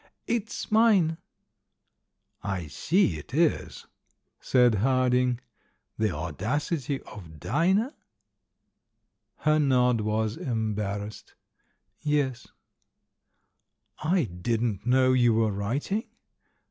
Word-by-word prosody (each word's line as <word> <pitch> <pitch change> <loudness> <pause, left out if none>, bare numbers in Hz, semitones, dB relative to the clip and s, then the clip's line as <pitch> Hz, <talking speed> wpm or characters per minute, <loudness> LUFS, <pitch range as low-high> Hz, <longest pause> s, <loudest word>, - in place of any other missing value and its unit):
"It's 225 -2 -3
mine." 200 -8 +4 1.2
"I 95 -4 -3
see 85 - +1
it 120 - -9
is," 165 0 0 0.5
said 125 -2 +4
Harding. 125 -1 +2 0.3
" - - -46
'The 110 -1 +2
Audacity 125 - -2
of 80 -7 -12
Dinah'?" 190 - +1 1.4
Her 155 0 +2
nod 125 -5 +3
was 110 +1 -1
embarrassed. 105 -3 -3 0.7
"Yes." 140 -4 -1 1.5
"I 170 +3 +2
didn't 110 +2 -2
know 130 +1 +4
you 120 -3 +4
were 110 -1 +2
writing." 130 - -2
125 Hz, 85 wpm, -27 LUFS, 105-150 Hz, 1.5 s, mine